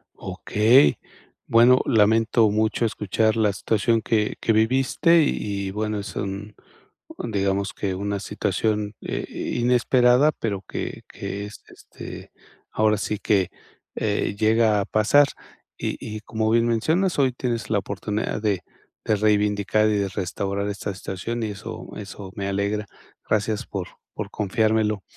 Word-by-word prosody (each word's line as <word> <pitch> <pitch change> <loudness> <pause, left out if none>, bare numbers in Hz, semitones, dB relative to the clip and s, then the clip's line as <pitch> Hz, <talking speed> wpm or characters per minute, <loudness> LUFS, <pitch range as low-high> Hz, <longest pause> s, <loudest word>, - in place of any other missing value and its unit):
Okey. 115 +7 +3 0.5
Bueno, 120 +3 +6
lamento 110 -1 +4
mucho 110 +2 +1
escuchar 110 +1 0
la 105 -2 +3
situación 110 +3 +1
que 105 -1 0
que 115 - +1
viviste. 130 +9 +3
Y 100 -7 -2
y - - -4
bueno, 105 0 -2
es 100 -2 -7
un 100 +1 -5 0.6
un - - -5
Digamos 100 -1 0
que 95 -2 -2
una 100 +1 -2
situación, 105 +1 -1
eh, - - -3 0.3
inesperada, 125 +3 +4
pero 100 -4 -2
que - - -5
que 100 +1 -6
es, 105 - -10
este, - - -11 0.4
ahora 110 0 +3
sí 105 0 -3
que, 100 -3 +1 0.4
eh, 105 -1 -1
llega 110 -1 +3
a - - -1
pasar. 115 +9 +4 0.5
Y - - -3
y 110 -1 -5
como 110 0 -1
bien 115 +1 +3
mencionas, 160 - +1
hoy 130 -2 +3
tienes 115 -3 -3
la 105 - +3
oportunidad 105 +2 -3
de 100 -4 0 0.4
de 110 - +3
reivindicar, 105 0 +2
y 105 - +1
de 100 - 0
restaurar 100 +1 -3
esta 100 0 -4
situación. 100 +5 -5
Y 105 - -2
eso 100 - -7
eso 100 -2 -8
me 100 -1 -3
alegra. 100 +2 -1 0.4
Gracias 110 0 0
por 95 -3 -4 0.3
por 105 -1 -5
confiármelo. 110 0 +1
105 Hz, 145 wpm, -24 LUFS, 100-115 Hz, 0.6 s, Bueno